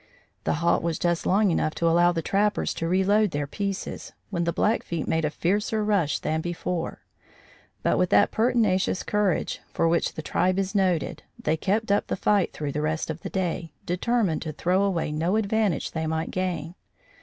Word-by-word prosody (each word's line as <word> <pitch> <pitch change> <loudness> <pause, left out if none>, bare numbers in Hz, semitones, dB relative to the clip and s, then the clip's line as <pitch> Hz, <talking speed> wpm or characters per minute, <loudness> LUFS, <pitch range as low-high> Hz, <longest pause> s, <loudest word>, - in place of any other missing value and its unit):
The - - +2
halt 170 - +3
was 165 -1 -1
just 175 -1 0
long 200 0 +3
enough 155 -1 0
to 170 - +1
allow 175 +1 +5
the 165 -2 -2
trappers 205 +4 +1
to 165 - -3
reload 200 +4 +3
their 145 -3 -2
pieces, 195 +6 -4 0.2
when 170 -3 -1
the 170 - +1
Blackfeet 170 -4 0
made 160 -1 +1
a - - +1
fiercer 205 +7 0
rush 195 -9 +1
than 160 +1 -1
before; 175 0 -3 0.8
but - - +2
with 180 - +2
that - - +4
pertinacious 220 -6 +2
courage 210 -4 0
for 165 - +1
which 170 +1 +1
the 155 - -5
tribe 185 +4 +1
is 195 0 -1
noted, 185 -6 0 0.2
they 160 - 0
kept 200 +6 0
up 205 - +2
the - - -1
fight 200 -1 +2
through 150 -2 -4
the 150 - -2
rest 155 +1 -1
of 160 +1 -8
the - - -5
day, 175 -4 -2
determined 185 -1 0
to 160 - -4
throw 180 +5 +1
away 185 -6 0
no 165 +6 0
advantage 215 -4 0
they 160 -1 -2
might 160 +1 -2
gain. 175 -3 -2
175 Hz, 190 wpm, -26 LUFS, 160-200 Hz, 0.8 s, allow